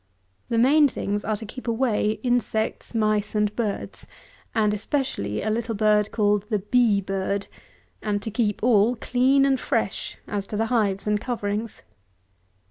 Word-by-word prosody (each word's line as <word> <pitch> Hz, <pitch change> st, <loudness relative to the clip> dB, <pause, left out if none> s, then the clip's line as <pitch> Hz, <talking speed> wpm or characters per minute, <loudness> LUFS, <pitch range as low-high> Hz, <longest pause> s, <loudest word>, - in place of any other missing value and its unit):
The 230 Hz, -, 0 dB
main 285 Hz, +5 st, +5 dB
things 205 Hz, -5 st, -3 dB
are 215 Hz, 0 st, -1 dB
to 220 Hz, -, -8 dB
keep 250 Hz, +4 st, -9 dB
away 225 Hz, -3 st, +1 dB
insects, 240 Hz, -2 st, -1 dB
mice, 215 Hz, -1 st, +1 dB
and 210 Hz, 0 st, +1 dB
birds, 215 Hz, -4 st, -4 dB, 0.5 s
and 210 Hz, -2 st, +2 dB
especially 210 Hz, -, -2 dB
a 215 Hz, -, 0 dB
little 225 Hz, 0 st, -2 dB
bird 210 Hz, 0 st, +3 dB
called 205 Hz, -1 st, +1 dB
the 215 Hz, -, +1 dB
bee 210 Hz, 0 st, +2 dB
bird; 195 Hz, +1 st, -2 dB, 0.6 s
and 210 Hz, -1 st, -1 dB
to 220 Hz, -, -4 dB
keep 215 Hz, -2 st, -1 dB
all 230 Hz, 0 st, +4 dB
clean 260 Hz, +4 st, +3 dB
and 270 Hz, -2 st, +2 dB
fresh -, -, -2 dB
as 200 Hz, -2 st, -3 dB
to 210 Hz, -, -4 dB
the 225 Hz, -, +1 dB
hives 200 Hz, -4 st, +1 dB
and 210 Hz, -1 st, +1 dB
coverings. 215 Hz, -2 st, -3 dB
215 Hz, 155 wpm, -24 LUFS, 205-240 Hz, 0.6 s, main